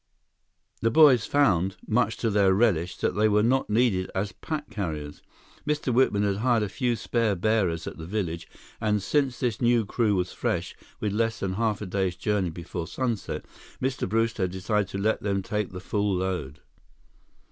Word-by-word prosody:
The 115 - +3
boys 130 -3 +6
found, 95 -10 +2
much 110 0 +1
to 115 - 0
their 100 -2 +4
relish, 90 -6 +1
that - - 0
they 110 +1 +3
were 105 0 +3
not 130 +4 +2
needed 105 -4 +2
as 100 +1 -1
pack 150 +7 -5
carriers. 75 -7 -4 0.4
Mr. 150 -4 -1
Whitman 115 -5 +3
had 100 -1 +1
hired 120 0 +2
a 105 - -2
few 120 +2 0
spare 115 -2 0
bearers 95 -4 +1
at - - -7
the 80 - -7
village, 85 -5 -3 0.3
and 105 -2 +1
since 130 +5 0
this 120 -4 -1
new 120 -2 +3
crew 105 0 +1
was 90 -1 -1
fresh, - - -2 0.2
with 105 -2 -1
less 115 0 0
than 95 - -1
a - - -4
half 110 -3 -1
day's 95 -1 -1
journey 100 -2 0
before 85 0 -6
sunset, 120 -5 -3 0.3
Mr. 130 -6 -2
Brewster 115 0 0
had 90 - -4
decided 100 +2 0
to 95 - -5
let 110 +3 0
them 100 -1 -1
take 105 0 -2
the 90 - -7
full 100 +1 -1
load. 90 -7 -3
105 Hz, 180 wpm, -26 LUFS, 95-115 Hz, 0.4 s, boys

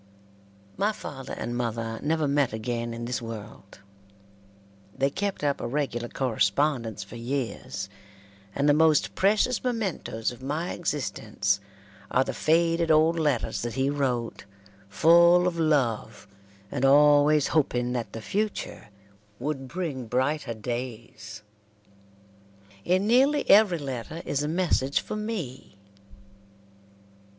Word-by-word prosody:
My 210 +2 +1
father 135 -9 -8
and 120 - -4
mother 115 -2 -3
never 155 0 0
met 140 -4 +1
again 115 +1 -3
in 115 0 -5
this 120 0 -3
world. 110 -3 -9 1.2
They 135 +1 +1
kept 200 0 -3
up 140 -1 0
a - - -2
regular 120 -3 -2
correspondence 115 -1 0
for 100 +4 -11
years, 125 +1 -4 0.7
and 140 +1 +1
the 145 - +6
most 155 -1 +3
precious 215 +5 +2
mementoes 200 - -2
of 120 - -12
my 150 +6 -3
existence 110 - -1 0.5
are 130 - +3
the - - -4
faded 165 +1 +2
old 160 +2 +4
letters 145 -7 0
that 120 -1 -4
he 135 +1 +1
wrote, 125 -7 -2 0.4
full 170 - +5
of 170 -2 -2
love, 130 -10 0 0.4
and 135 -2 -3
always 145 +1 +5
hoping 125 -5 +1
that 120 -3 -4
the 115 - -7
future 210 - -3 0.5
would 135 0 -4
bring 140 -5 -4
brighter 130 +1 -1
days. 115 -2 -6 1.4
In 185 - +2
nearly 270 +6 +3
every 200 -3 +6
letter 140 +3 -6
is 145 - -1
a 150 - -1
message 155 -5 +1
for - - -6
me. 185 - -5
140 Hz, 125 wpm, -26 LUFS, 120-165 Hz, 1.4 s, the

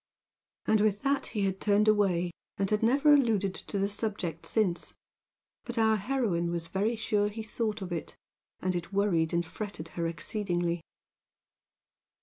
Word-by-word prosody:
And 215 -1 +3
with 210 -1 +1
that 275 0 +1
he 210 - -3
had 195 -1 -1
turned 210 +1 +3
away, 190 -5 +3 0.3
and 195 - +1
had 210 - +2
never 275 +6 +5
alluded 220 -9 +3
to 200 - -5
the 195 0 +2
subject 200 -6 -3
since; 195 -6 0 0.7
but 240 0 -5
our 220 -1 +4
heroine 205 -6 0
was 170 -1 -2
very 200 +7 0
sure 210 -2 +1
he 220 +1 -6
thought 215 -1 -2
of 180 - -6
it, 170 -2 -4 0.5
and 185 0 0
it 175 +1 -4
worried 195 -5 +2
and 170 0 +1
fretted 170 -3 -6
her 170 0 -2
exceedingly. 175 0 -1
200 Hz, 155 wpm, -30 LUFS, 175-220 Hz, 0.7 s, never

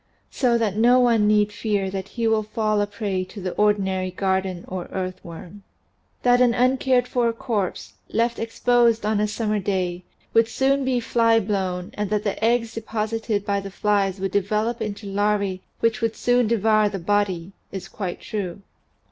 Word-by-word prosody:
So 240 -3 +2
that 215 -3 -1
no 245 +3 +5
one 230 -4 +4
need 210 0 +3
fear 205 -3 -1
that 190 -1 -4
he 235 -1 -3
will 220 -1 +3
fall 215 -1 0
a 205 - 0
prey 200 -2 -2
to 195 +3 -10
the 185 -1 -3
ordinary 190 -3 +1
garden 190 -1 -1
or 185 -1 -5
earth 185 -1 -5
worm. 170 +4 -10 0.6
That 245 0 +4
an 240 -2 +4
uncared 255 0 +2
for 240 -2 +1
corpse, 195 - -3 0.2
left 235 +1 0
exposed 230 -1 +2
on 215 -1 +1
a 210 - +2
summer 215 0 -1
day, 185 -2 -2 0.3
would 230 0 +5
soon 270 +3 +1
be 260 -1 +1
flyblown 205 -6 +1
and 210 -1 -3
that 210 0 0
the 205 +1 -3
eggs 230 0 +2
deposited 220 -1 -2
by 200 -1 0
the 195 0 -7
flies 195 -1 0
would 195 0 -2
develop 210 +4 0
into 210 0 -4
larvae 200 -1 0 0.2
which 230 +1 +1
would 225 -1 0
soon 245 -1 +2
devour 215 -1 +3
the 200 - -4
body, 190 -1 0 0.2
is 190 -2 -6
quite 185 -4 -5
true. 200 -2 -5
210 Hz, 175 wpm, -23 LUFS, 195-230 Hz, 0.6 s, no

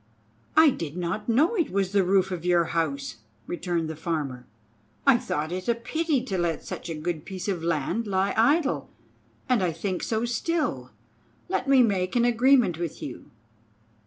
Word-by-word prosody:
"I 315 -2 +8
did 165 - -5
not 180 +5 -3
know 290 - +3
it 340 -6 +1
was 195 -1 0
the 200 -1 +3
roof 190 +1 +2
of 175 -2 -4
your 175 -1 +3
house," 145 -7 -2 0.3
returned 175 0 -2
the 160 - -5
Farmer. 145 -6 -4 0.6
"I 270 -4 +6
thought 155 +2 -3
it 185 +1 -4
a 235 - +3
pity 300 +3 -1
to 195 -8 -2
let 170 -2 -1
such 175 - -6
a 165 - -3
good 155 0 -3
piece 190 0 -6
of 180 -5 -2
land 170 +7 -1
lie 195 0 +1
idle, 280 +5 +2 0.6
and 250 -6 +2
I 180 -2 +1
think 180 +3 -3
so 225 +1 -1
still. 310 +8 -1 0.6
Let 285 -7 -1
me 270 -2 +6
make 190 -4 0
an 240 -1 +4
agreement 240 - +4
with 170 -3 -4
you." 130 - -8
190 Hz, 175 wpm, -26 LUFS, 170-240 Hz, 0.6 s, I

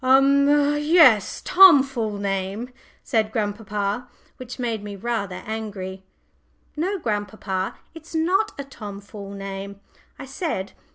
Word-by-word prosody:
"Umph! 280 +2 +4
yes 295 - +5
Tom 355 -7 +8
fool 230 -6 -3
name!" 200 +4 -3 0.3
said 220 -4 0
grandpapa, 210 +1 -2 0.3
which 250 -1 -8
made 230 -4 -3
me 205 -1 -7
rather 200 -3 -3
angry. 200 -4 -5 0.7
"No, 370 +6 -1
grandpapa, 205 - -3 0.2
it's 325 0 -11
not 360 +6 +1
a 280 - -4
Tom 210 -7 -9
fool 200 0 -10
name," 195 0 -7 0.4
I - - -8
said. 270 - -4
220 Hz, 120 wpm, -23 LUFS, 200-280 Hz, 0.7 s, Tom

